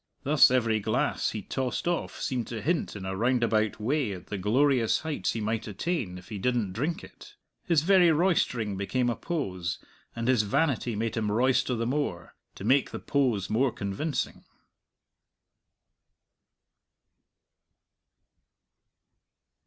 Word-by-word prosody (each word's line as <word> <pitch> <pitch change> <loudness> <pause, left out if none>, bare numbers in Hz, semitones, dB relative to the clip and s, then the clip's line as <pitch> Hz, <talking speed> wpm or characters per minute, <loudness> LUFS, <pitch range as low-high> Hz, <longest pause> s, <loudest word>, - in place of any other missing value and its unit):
Thus 145 +1 +6
every 115 -4 +2
glass 100 - 0
he 105 -2 -5
tossed 130 - -3
off 175 -1 -2
seemed 125 -3 -2
to 115 - -5
hint 165 -6 0
in 95 -2 -6
a 95 0 -3
roundabout 115 -1 +1
way 125 0 0
at 90 -2 -9
the 105 - -5
glorious 120 +3 +2
heights 160 -2 -2
he 115 - -3
might 110 +1 -2
attain 105 - -3
if 90 +4 -13
he 105 -3 -5
didn't 115 -4 0
drink 145 - -2
it. - - -14 0.3
His 165 -4 +3
very 180 -1 +5
roistering 140 - +1
became 120 +5 0
a - - -2
pose, 95 - -3 0.4
and 115 0 -3
his 130 -4 +4
vanity 125 0 0
made 115 +1 -2
him 110 -3 -1
roister 125 +2 +2
the 115 0 -2
more, 120 - -2 0.2
to - - -9
make 130 +6 +3
the - - -5
pose 120 -10 0
more 125 +6 +2
convincing. 100 +10 -3
120 Hz, 135 wpm, -28 LUFS, 105-140 Hz, 0.4 s, Thus